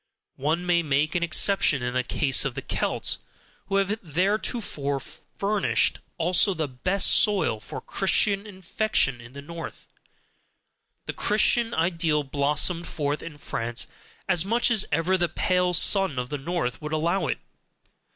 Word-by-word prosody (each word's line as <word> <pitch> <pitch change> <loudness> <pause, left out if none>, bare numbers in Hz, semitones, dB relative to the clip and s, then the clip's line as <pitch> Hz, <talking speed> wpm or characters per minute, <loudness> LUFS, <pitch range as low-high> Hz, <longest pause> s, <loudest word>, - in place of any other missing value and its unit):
One 160 +6 -1
may 175 -1 +2
make 150 0 0
an 175 - 0
exception 170 -4 +4
in 125 0 -2
the 130 - +1
case 135 +1 +1
of 135 -4 -3
the - - -5
Celts, - - -1 0.5
who 195 - -2
have 195 +2 0
theretofore 180 - -1
furnished 200 +8 -1 0.2
also 180 +3 +2
the 155 -3 -2
best 180 +10 0
soil 195 - +4
for 105 - -8
Christian 200 +1 0
infection 190 - -1
in 120 +2 -14
the 140 0 -9
North: 165 +2 -9 1.2
the - - -5
Christian 230 +2 +2
ideal 165 -3 +1
blossomed 150 +5 0
forth 145 -2 -2
in 160 -3 -9
France 120 -4 -4 0.4
as 170 - +3
much 235 +4 +2
as 220 -4 +3
ever 165 +5 +1
the 175 -1 +1
pale 180 0 +1
sun 190 -3 +3
of 125 0 -3
the 145 - -4
north 140 -4 -3
would 150 0 -5
allow 170 +2 0
it. - - -1
170 Hz, 150 wpm, -25 LUFS, 145-195 Hz, 1.2 s, exception